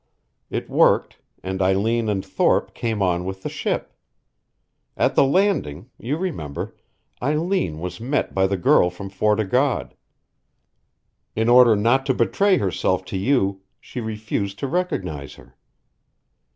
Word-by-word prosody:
It -, -, -4 dB
worked, -, -, +2 dB, 0.2 s
and 95 Hz, +1 st, -3 dB
Eileen 110 Hz, +4 st, +1 dB
and 95 Hz, -2 st, -1 dB
Thorpe -, -, +1 dB
came 110 Hz, -4 st, -2 dB
on 90 Hz, -1 st, +1 dB
with 95 Hz, +1 st, -6 dB
the -, -, -3 dB
ship. -, -, -3 dB, 1.0 s
At -, -, +2 dB
the -, -, +5 dB
landing 135 Hz, -, 0 dB
you 135 Hz, +6 st, -2 dB
remember 110 Hz, -, -5 dB, 0.5 s
Eileen 150 Hz, -, 0 dB
was 90 Hz, +1 st, -6 dB
met 135 Hz, +5 st, -1 dB
by 95 Hz, 0 st, +2 dB
the 100 Hz, 0 st, -1 dB
girl 90 Hz, 0 st, +4 dB
from 95 Hz, +2 st, -9 dB
Fort 105 Hz, +2 st, +1 dB
o' 110 Hz, -, +1 dB
God. 125 Hz, +6 st, 0 dB, 1.4 s
In 110 Hz, +1 st, 0 dB
order 120 Hz, -2 st, +7 dB
not 120 Hz, +6 st, +2 dB
to 130 Hz, -, +2 dB
betray 195 Hz, -, +2 dB
herself 95 Hz, -, 0 dB
to -, -, -1 dB
you 100 Hz, -3 st, +1 dB, 0.2 s
she 125 Hz, -, -7 dB
refused 110 Hz, -2 st, -3 dB
to 140 Hz, -, -3 dB
recognize 95 Hz, -, -3 dB
her. -, -, -18 dB
105 Hz, 140 wpm, -22 LUFS, 95-130 Hz, 1.4 s, order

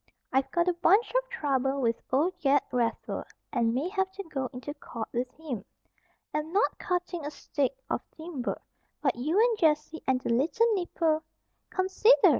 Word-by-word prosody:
I've 265 Hz, 0 st, +2 dB
got 345 Hz, 0 st, +1 dB
a 360 Hz, -, +4 dB
bunch 365 Hz, +6 st, +4 dB
of -, -, +1 dB
trouble 270 Hz, -, 0 dB
with 230 Hz, -3 st, +1 dB
old 305 Hz, +8 st, +3 dB
Ged 285 Hz, 0 st, +4 dB
Raffer 235 Hz, -2 st, -1 dB, 0.3 s
and 235 Hz, -3 st, +2 dB
may 265 Hz, +8 st, 0 dB
have 380 Hz, -1 st, 0 dB
to 395 Hz, +1 st, -5 dB
go 270 Hz, -7 st, -3 dB
into 255 Hz, +4 st, -6 dB
court 235 Hz, -6 st, -6 dB
with 245 Hz, +1 st, -1 dB
him. 260 Hz, -11 st, -4 dB, 0.7 s
Am 305 Hz, +1 st, -2 dB
not 400 Hz, +5 st, +2 dB
cutting 355 Hz, -3 st, -2 dB
a 290 Hz, -, -2 dB
stick 290 Hz, -, -2 dB
of -, -, -1 dB, 0.2 s
timber. 315 Hz, -6 st, -3 dB, 0.4 s
But 270 Hz, -4 st, +3 dB
you 305 Hz, -, +1 dB
and 460 Hz, -1 st, +4 dB
Jessie 310 Hz, -1 st, +2 dB
and 260 Hz, -1 st, +3 dB
the 255 Hz, -, -4 dB
little 310 Hz, -, +3 dB
nipper," 330 Hz, -4 st, +1 dB, 0.5 s
("Consider!" 380 Hz, +3 st, +5 dB
305 Hz, 170 wpm, -29 LUFS, 265-365 Hz, 0.7 s, Consider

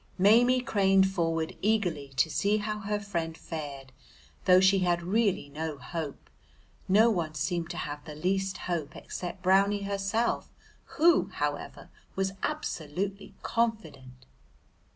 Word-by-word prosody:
Maimie 240 Hz, +6 st, +5 dB
craned 195 Hz, -6 st, +3 dB
forward 165 Hz, -3 st, -1 dB
eagerly 180 Hz, -10 st, 0 dB
to 135 Hz, +5 st, +3 dB
see 200 Hz, +6 st, +1 dB
how 210 Hz, 0 st, -3 dB
her 210 Hz, 0 st, -2 dB
friend 170 Hz, -5 st, -4 dB
fared, 140 Hz, -5 st, -7 dB, 0.5 s
though 185 Hz, -1 st, +7 dB
she 190 Hz, +1 st, +5 dB
had 175 Hz, -1 st, +1 dB
really 200 Hz, -4 st, +1 dB
no 155 Hz, +1 st, -4 dB
hope; 150 Hz, +2 st, -6 dB, 0.6 s
no 220 Hz, +5 st, +5 dB
one 165 Hz, -6 st, -2 dB
seemed 165 Hz, +3 st, -2 dB
to 175 Hz, -, -5 dB
have 145 Hz, -2 st, -5 dB
the 150 Hz, -, -8 dB
least 190 Hz, +4 st, -1 dB
hope 170 Hz, -4 st, -3 dB
except 180 Hz, +1 st, -7 dB
Brownie 200 Hz, +2 st, +3 dB
herself, 200 Hz, +4 st, -1 dB, 0.5 s
who, 340 Hz, +2 st, +5 dB
however, -, -, -4 dB, 0.2 s
was 190 Hz, 0 st, 0 dB
absolutely 195 Hz, -, -3 dB
confident. 155 Hz, -, -2 dB
185 Hz, 130 wpm, -29 LUFS, 160-205 Hz, 0.6 s, though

